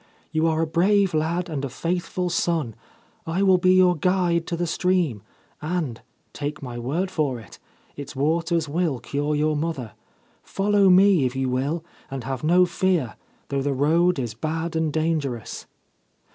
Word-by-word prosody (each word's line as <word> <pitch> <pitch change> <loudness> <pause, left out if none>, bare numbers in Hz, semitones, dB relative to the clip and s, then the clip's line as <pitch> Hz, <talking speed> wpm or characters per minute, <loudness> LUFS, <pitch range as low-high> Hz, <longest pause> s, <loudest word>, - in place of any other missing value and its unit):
You 160 +1 +1
are 160 0 +1
a - - +1
brave 185 +4 +2
lad 165 +3 0
and 150 -5 -4
a 140 - -2
faithful 175 +4 -2
son. 165 -8 0 0.5
I 175 +4 0
will 190 -2 +5
be 185 +1 +4
your 180 -1 +5
guide 175 0 +1
to 170 - -2
the 175 - -1
stream, 170 - 0 0.4
and 155 -7 -3 0.2
— - - -43
take 145 0 -5
my 120 -2 -6
word 165 +11 -2
for 145 -8 -1
it 110 - -14 0.2
— - - -34
its 140 0 -8
waters 165 +3 0
will 160 -2 0
cure 145 +5 -2
your 155 +1 +1
mother. 145 -7 -3 0.5
Follow 200 0 +2
me 185 -6 +5
if 125 - -6
you 130 -1 -1
will, 140 +6 -1 0.2
and 135 -2 -5
have 135 +1 -4
no 175 +3 +5
fear, 175 - 0 0.3
though 140 -1 -1
the 140 0 -1
road 165 +6 +3
is 120 -5 -3
bad 160 +7 -3
and 160 -1 0
dangerous.' 150 -7 -2
160 Hz, 175 wpm, -24 LUFS, 140-180 Hz, 0.5 s, will